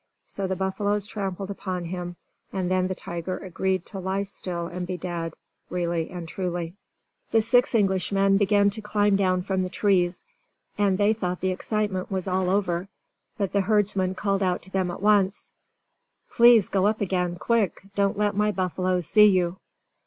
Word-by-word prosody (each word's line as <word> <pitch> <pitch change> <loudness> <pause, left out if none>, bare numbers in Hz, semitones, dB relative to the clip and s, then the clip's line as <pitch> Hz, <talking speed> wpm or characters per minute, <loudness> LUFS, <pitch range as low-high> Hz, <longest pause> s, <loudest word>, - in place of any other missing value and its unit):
So 195 -1 -3
the 190 - -1
buffaloes 200 +2 -1
trampled 195 -2 -4
upon 185 -3 -4
him, 175 0 -5 0.4
and 185 -2 -2
then 185 0 +2
the 185 - -3
tiger 175 +1 -5
agreed 185 0 -2
to 195 - -7
lie 190 +2 -1
still 180 -3 -3
and 175 +1 -5
be 185 -1 -3
dead, 170 -2 -4 0.3
really 170 -2 -1
and 175 -2 -7
truly. 175 -1 -3 0.6
The 225 -1 +3
six 245 +1 +3
Englishmen 195 -1 +2
began 200 0 +3
to 220 +2 -6
climb 205 -1 +2
down 185 -2 +1
from 190 -1 -1
the 185 - -2
trees, 180 -3 +1 0.5
as 200 -2 +2
they 205 +2 +3
thought 180 -4 -3
the 185 - +1
excitement 200 0 -2
was 190 -1 -2
all 185 0 0
over. 185 -2 0 0.5
But 200 -3 -2
the 200 - +3
herdsman 195 -2 +1
called 195 0 0
out 180 -2 0
to 190 - -9
them 190 -2 0
at 175 - -6
once: 205 -2 +2 0.8
"Please 235 -3 +6
go 195 0 +2
up 215 +1 0
again 180 -3 -1
quick! 200 +3 0
Don't 200 +1 +1
let 205 0 +1
my 210 +1 +2
buffaloes 185 -2 -1
see 210 +4 +6
you!" 185 -2 +2
190 Hz, 175 wpm, -25 LUFS, 180-205 Hz, 0.8 s, Please